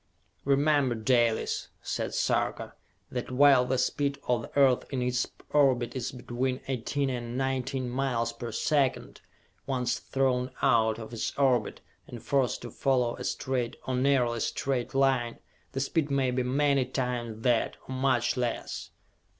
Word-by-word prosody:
"Remember, 140 -2 +3
Dalis," 115 0 +1 0.2
said - - -3
Sarka, - - 0 0.4
"that 125 -1 -4
while 130 -1 +5
the 130 +1 0
speed 140 +2 0
of 120 -2 +2
the 115 - -9
Earth 135 -3 +5
in 135 - -2
its 125 0 0 0.2
orbit 130 -5 +3
is 125 -3 -3
between 125 +1 -2
eighteen 135 +2 -1
and 120 -1 -4
nineteen 130 -1 -1
miles 120 -2 -1
per 115 0 -6
second, 140 +2 0 0.5
once 125 -3 0
thrown 130 -2 0
out 110 -4 +3
of 115 +1 -9
its 115 - -3
orbit, 135 -3 +1 0.3
and 120 - -9
forced 135 -4 0
to 120 - -7
follow 125 -2 +1
a - - -6
straight 125 -2 -2
or 130 - -2
nearly 125 -2 +2
straight 130 +2 -2
line, 130 -3 +2 0.4
the 135 - -2
speed 145 +2 0
may 135 -2 +1
be 125 +1 0
many 135 +1 +2
times 120 -3 -3
that 120 -3 +1
or 130 - -5
much 130 -2 +1
less!" 125 -2 -3
130 Hz, 150 wpm, -28 LUFS, 120-135 Hz, 0.5 s, while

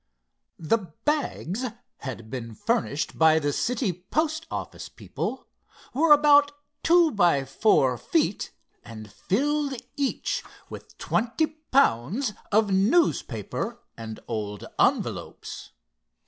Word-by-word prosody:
The 195 +8 +1 0.3
bags 260 - -1 0.3
had 115 -5 -7
been 115 -4 -6
furnished 210 - -1
by 160 -1 +6
the 145 -2 0
city 230 - 0
post 310 - -2
office - - -6
people, - - -5 0.5
were 305 +5 +3
about 290 -1 +6 0.3
two 340 -1 +5
by 175 - +3
four 135 - +2
feet - - 0 0.3
and 110 -3 -10
filled 280 +4 0 0.2
each 280 -2 -1 0.3
with - - -11
twenty 245 +7 0
pounds 270 - +1 0.2
of 210 -1 +3
newspapers 230 - +1 0.2
and 110 -1 -7
old 105 -3 -4
envelopes. - - -1
215 Hz, 105 wpm, -26 LUFS, -, 0.5 s, by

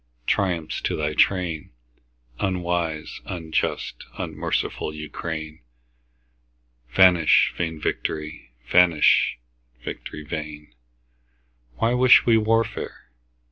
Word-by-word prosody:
Triumph 85 -3 -1
to - - 0
thy 75 -1 -1
train, 85 -3 +1 0.7
Unwise, 85 -4 -2
unjust, 80 -3 -3
unmerciful - - -2
Ukraine! 80 0 -6 1.3
Vanish 90 +1 +5
vain 80 -2 -3
victory! 75 -1 -4 0.2
vanish, 85 0 +4 0.5
victory 75 - -7
vain! 75 -3 -7 1.0
Why 115 - +1
wish 125 0 +6
we 115 - +5
warfare? 110 - -1
80 Hz, 80 wpm, -24 LUFS, 75-90 Hz, 1.3 s, wish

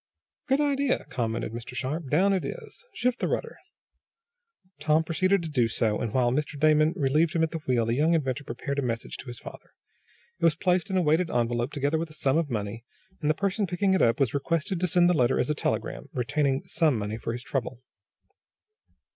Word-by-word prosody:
"Good 270 0 +2
idea," 280 -2 +1
commented 115 -3 -2
Mr. 120 +2 -8
Sharp. 140 +3 -3
"Down 190 +8 +3
it 190 - 0
is. 470 -1 -8
Shift 250 0 -1
the - - 0
rudder." - - -3 1.2
Tom 155 +1 +3
proceeded 185 +3 +1
to - - -4
do 125 -6 +2
so, 110 -2 0
and, 115 - -2
while 120 0 +2
Mr. 145 +2 -2
Damon 155 +1 +4
relieved 155 +2 +2
him 165 - +2
at 160 - 0
the 165 - -3
wheel 120 -3 +2
the 115 - 0
young 155 +6 +3
inventor 140 -3 -1
prepared 140 +3 -4
a - - +1
message 115 -3 -3
to - - -10
his 120 -1 -7
father. - - -12 0.6
It - - -10
was 165 -2 +5
placed 180 +1 +1
in 190 - 0
a 180 - +3
weighted 160 +3 +2
envelope, 120 +2 0
together 145 +2 0
with 165 0 -3
a - - -10
sum 150 0 +1
of 160 -3 -2
money, 110 -1 -4 0.4
and 150 - 0
the 155 - +3
person 200 +3 0
picking 190 +2 +1
it 190 - +2
up 115 +3 +3
was 135 -5 +1
requested 165 +6 -1
to 180 - +1
send 175 +1 +4
the 180 - +4
letter 130 -4 +2
as - - +1
a - - +2
telegram, 145 - -3
retaining 135 +2 0
some 155 -7 +2
money 105 +1 -3
for 115 - -3
his 120 +1 -5
trouble. 130 -2 -4
150 Hz, 215 wpm, -27 LUFS, 125-170 Hz, 1.2 s, was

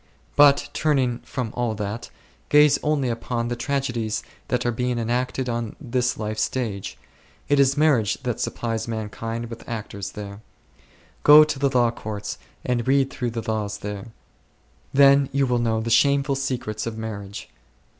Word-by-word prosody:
But 145 0 +5
turning 130 -6 +1
from 125 -6 -5
all 120 -3 -1
that, 105 +2 -5 0.4
gaze 150 -1 +6
only 150 -3 +1
upon 115 0 -2
the 120 - -1
tragedies 120 -4 -2 0.2
that 125 0 -1
are 120 - +2
being 125 +1 -1
enacted 125 +3 -1
on 115 -2 -3
this 125 -3 -1
life's 110 0 -3
stage; 110 -7 -3 0.5
it 145 -1 +3
is 140 +1 +4
marriage 135 -9 +3
that 120 -3 -2
supplies 115 -1 -2
mankind 115 +1 -4
with 115 0 -9
actors 105 -4 -5
there. 100 0 -8 0.8
Go 150 +1 +9
to 150 -2 -3
the 140 0 +2
law 120 -3 +3
courts 105 - -6 0.3
and 125 -1 -1
read 135 0 +3
through 125 -2 -2
the 115 -1 -5
laws 105 -2 -2
there; 105 +1 -6 0.8
then 140 0 +5
you 140 0 +2
will 125 -1 +1
know 110 -1 0
the 115 +1 -3
shameful 140 +2 +3
secrets 125 -6 -3
of 115 -1 -4
marriage. 100 -3 -6
120 Hz, 155 wpm, -24 LUFS, 110-135 Hz, 0.8 s, Go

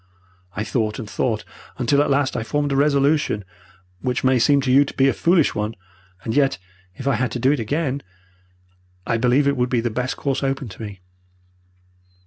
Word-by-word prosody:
I 105 - -2
thought 110 -2 -1
and 115 - -6
thought 110 0 -1 0.3
until 140 +3 +2
at 145 - +1
last 140 -1 +1
I - - -1
formed 145 +5 -1
a - - +1
resolution 140 -6 +2 0.5
which 125 -1 -2
may 130 -1 +3
seem 140 +4 +4
to 130 -2 0
you 140 +2 +6
to 145 - -8
be 135 - +4
a 135 - +3
foolish 170 -3 +3
one, 105 +1 -3 0.5
and 110 - -2
yet, 135 -2 +3 0.4
if 130 - -6
I 140 - +3
had 125 +1 0
to 125 - -3
do 130 +3 +3
it 145 - 0
again, 140 +4 -1 1.0
I 115 - 0
believe 125 +5 +3
it 140 -1 +1
would 125 0 +1
be 125 - +1
the 120 0 -1
best 125 +3 -2
course 140 -2 -1
open 135 -2 -2
to 100 - -11
me. 100 -3 -8
130 Hz, 200 wpm, -22 LUFS, 115-140 Hz, 1.0 s, you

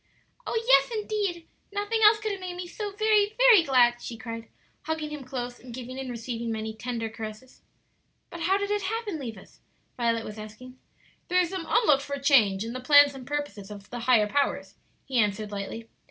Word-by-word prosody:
"Oh, 455 - 0
yes, - - +6
indeed; 405 -6 -3 0.2
nothing 410 +2 -1
else 430 0 +7
could 435 0 -2
have 390 -1 -5
made 365 -1 -5
me 355 0 -5
so 410 +4 -5
very, 425 0 +2
very - - +7
glad!" 245 -5 +3
she 230 - -7
cried, 230 0 -7 0.4
hugging 310 -1 -3
him 295 -2 -6
close, 245 -1 -5
and 245 -2 -10
giving 255 +1 -7
and 265 -1 -5
receiving 235 -1 -4
many 220 0 -4
tender 230 0 -4
caresses. 220 +3 -9 0.7
"But 345 - -8
how 375 +4 +2
did 405 0 -2
it 415 0 0
happen. 415 -3 -3
Levis?" 225 -7 -9 0.4
Violet 230 -2 0
was 215 0 -8
asking. 250 +5 -11 0.5
"Through 360 0 +3
some 355 -1 -5
unlooked 295 - +4
for 280 0 -4
change 225 -8 +3
in 230 - -5
the 255 - -4
plans 285 +2 +6
and 260 -2 -10
purposes 285 -9 -4
of 205 -1 -11
the 245 - -5
higher 235 -2 +4
powers," 280 +6 -1 0.3
he 260 -3 0
answered, 210 0 0
lightly. 205 +3 -6
260 Hz, 190 wpm, -27 LUFS, 230-365 Hz, 0.7 s, else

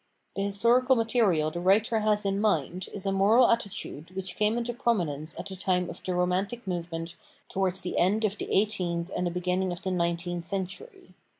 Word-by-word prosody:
The 195 - -2
historical 235 +6 +3
material 220 -10 +2
the 175 - -4
writer 210 +5 +3
has 210 -1 +1
in 195 +1 0
mind 180 -3 0
is 200 -1 -4
a 195 - +1
moral 210 +6 +5
attitude 200 -8 -2
which 190 -1 -4
came 215 +2 +2
into 240 0 -2
prominence 165 -11 -1
at - - -5
the 195 - -7
time 180 -2 0
of 170 - -10
the 185 - -2
Romantic 185 +6 -1
movement 170 -2 -4 0.3
towards 190 -1 -1
the 180 - -2
end 205 +5 +3
of 205 -1 -2
the - - -5
eighteenth 180 -4 0
and 180 - 0
the - - +1
beginning 180 +1 -1
of 175 +1 -6
the 190 - -1
nineteenth 170 0 -1
century. 190 -1 -5
190 Hz, 190 wpm, -28 LUFS, 175-210 Hz, 0.3 s, moral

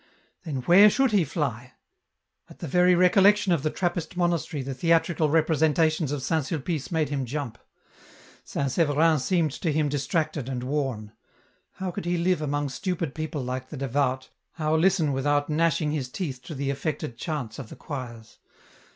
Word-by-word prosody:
Then 135 -6 -4
where 195 +8 +7
should 265 +3 +2
he 200 -4 +4
fly? 130 -5 -3 0.8
At - - -14
the 170 - -6
very 180 +4 +4
recollection 195 +2 +4
of 165 - 0
the 155 - 0
Trappist 175 0 -3
monastery 170 -4 0
the 135 +1 -4
theatrical 165 +1 +2
representations 160 -1 +2
of 145 -3 -3
St. 160 0 0
Sulpice 155 0 -3
made 160 -4 0
him 140 -2 -2
jump. 125 -3 -5 0.8
St. 140 -2 -2
Severin 155 +1 +3
seemed 160 +2 +1
to 160 +4 -2
him 150 0 +1
distracted 145 -1 -2
and 125 -2 -3
worn. 130 -6 -2 0.6
How 190 -1 -4
could 170 - -6
he 175 0 0
live 175 -1 +1
among 145 -1 -1
stupid 170 -1 -3
people 155 -3 -4
like 130 +1 -4
the 150 - -7
devout, 130 0 -1 0.2
how 155 -1 0
listen 165 -3 +2
without 145 +2 0
gnashing 155 -1 +1
his 140 -5 -3
teeth 135 -4 -5
to 160 - -7
the 140 0 -1
affected 140 -1 -4
chants 135 -4 -5
of 125 -5 -8
the - - -10
choirs 120 -6 -8
150 Hz, 170 wpm, -26 LUFS, 135-170 Hz, 0.8 s, where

